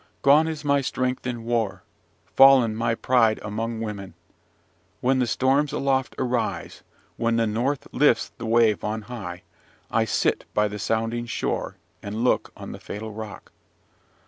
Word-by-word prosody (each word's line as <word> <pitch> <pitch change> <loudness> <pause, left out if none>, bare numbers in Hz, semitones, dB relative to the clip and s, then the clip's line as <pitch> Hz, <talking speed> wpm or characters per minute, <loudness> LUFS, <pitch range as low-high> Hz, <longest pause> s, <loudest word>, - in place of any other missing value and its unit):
Gone 150 +3 +6
is 155 -2 -5
my 140 -1 +3
strength 130 -1 -2
in 120 -2 -4
war, 115 -3 -1 0.5
fallen 135 -5 +7
my 115 0 0
pride 115 -3 +2
among 110 +2 -3
women. 100 -5 -6 0.8
When 130 +1 +2
the 125 - +1
storms 135 +5 +2
aloft 135 -1 0
arise, 125 -2 -2 0.4
when 115 0 +1
the 115 0 +2
north 120 +6 -1
lifts 145 +2 +2
the 115 - -4
wave 115 -2 +3
on 110 +1 -3
high, 95 -7 -7 0.5
I - - +2
sit - - 0
by 105 0 +3
the 105 0 -6
sounding 115 +3 -1
shore, - - -3 0.2
and 105 +3 -4
look 125 - +1
on - - -8
the - - -8
fatal 110 +2 -7
rock. 110 -1 -9
115 Hz, 150 wpm, -24 LUFS, 110-130 Hz, 0.8 s, fallen